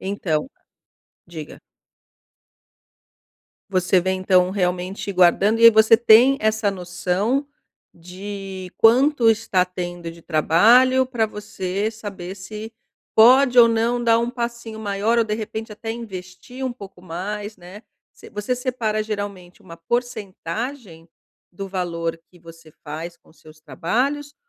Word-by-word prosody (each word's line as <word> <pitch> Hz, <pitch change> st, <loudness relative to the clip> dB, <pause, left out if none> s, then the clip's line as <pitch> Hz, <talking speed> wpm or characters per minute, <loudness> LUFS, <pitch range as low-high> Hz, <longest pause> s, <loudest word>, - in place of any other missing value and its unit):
Então. 190 Hz, -, -2 dB, 0.8 s
Diga. 160 Hz, -3 st, -10 dB, 2.1 s
Você 185 Hz, -1 st, +2 dB
vem 185 Hz, +1 st, -2 dB
então 185 Hz, -1 st, +3 dB
realmente 185 Hz, +1 st, -2 dB
guardando, 190 Hz, +5 st, +3 dB
e 230 Hz, -, +4 dB
aí 230 Hz, -, +11 dB
você 220 Hz, +1 st, +6 dB
tem 235 Hz, +4 st, +6 dB
essa 215 Hz, -1 st, +1 dB
noção 190 Hz, +8 st, -2 dB, 0.5 s
de 190 Hz, +1 st, -8 dB
quanto 245 Hz, +1 st, +4 dB
está 205 Hz, -4 st, +1 dB
tendo 175 Hz, -2 st, -6 dB
de 165 Hz, 0 st, -14 dB
trabalho, 235 Hz, +12 st, +4 dB
pra 240 Hz, -4 st, 0 dB
você 205 Hz, -1 st, -4 dB
saber 195 Hz, -4 st, -8 dB
se 215 Hz, +4 st, -9 dB, 0.4 s
pode 250 Hz, +2 st, +6 dB
ou 230 Hz, -1 st, +8 dB
não 230 Hz, +2 st, 0 dB
dar 230 Hz, -1 st, +4 dB
um 235 Hz, +1 st, -1 dB
passinho 235 Hz, -2 st, -5 dB
maior, 210 Hz, +2 st, -1 dB
ou 230 Hz, -, +3 dB
de 210 Hz, -1 st, -2 dB
repente 220 Hz, 0 st, -6 dB
até 225 Hz, +2 st, -7 dB
investir 225 Hz, +3 st, -8 dB
um 255 Hz, -, -2 dB
pouco 200 Hz, -6 st, -13 dB
mais, 205 Hz, +5 st, -6 dB
né. 180 Hz, +4 st, -13 dB, 0.3 s
Você -, -, -15 dB
você 210 Hz, +5 st, -2 dB
separa 240 Hz, -4 st, -2 dB
geralmente 205 Hz, -3 st, -7 dB
uma 165 Hz, -3 st, -12 dB
porcentagem 215 Hz, -, -5 dB, 0.4 s
do 195 Hz, +2 st, -7 dB
valor 170 Hz, -3 st, -3 dB
que 180 Hz, -, -20 dB
você 165 Hz, -1 st, -15 dB
faz 165 Hz, +3 st, -7 dB
com -, -, -26 dB
os 160 Hz, -, -25 dB
seus 155 Hz, 0 st, -17 dB
trabalhos? 260 Hz, -, -2 dB
205 Hz, 130 wpm, -21 LUFS, 180-230 Hz, 2.1 s, aí